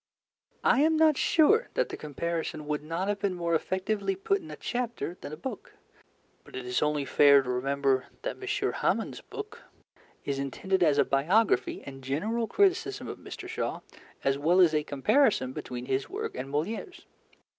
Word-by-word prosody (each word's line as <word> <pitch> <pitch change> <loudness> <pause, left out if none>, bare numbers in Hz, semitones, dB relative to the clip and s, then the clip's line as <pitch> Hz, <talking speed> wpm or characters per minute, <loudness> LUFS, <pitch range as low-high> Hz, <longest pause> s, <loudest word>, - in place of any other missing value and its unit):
I 260 - +4
am 315 +1 +4
not 315 -1 +5
sure 405 - +4
that - - +1
the - - -5
comparison 160 +1 -4
would 150 0 -2
not 165 +5 -3
have 205 0 -1
been 200 -2 -1
more 170 -1 -1
effectively 200 - -1
put 395 0 0
in 320 - -11
a - - -6
chapter 240 -7 -3
than - - -7
a 155 - -6
book, 225 +5 -7 0.7
but - - -14
it 130 - -5
is 125 0 0
only 150 -1 +1
fair 140 -1 +6
to 125 - -6
remember 135 +1 0 0.2
that - - -4
M. 405 +1 -1
Hamon's - - -1
book 430 +1 -8 0.6
is 140 -1 -2
intended 185 +8 -1
as 150 -4 +4
a - - +4
biography 180 +11 +2
and 135 -1 -10
general 210 - -1
criticism 400 - +1
of - - -7
Mr. - - -8
Shaw - - -3 0.4
as 135 0 +1
well 170 +5 +3
as 175 -4 +6
a 155 - +2
comparison 145 - +2
between 125 -1 -6
his 135 +1 -1
work - - -4
and 130 +2 -5
Molière's. 195 - -4
170 Hz, 175 wpm, -28 LUFS, -, 0.7 s, fair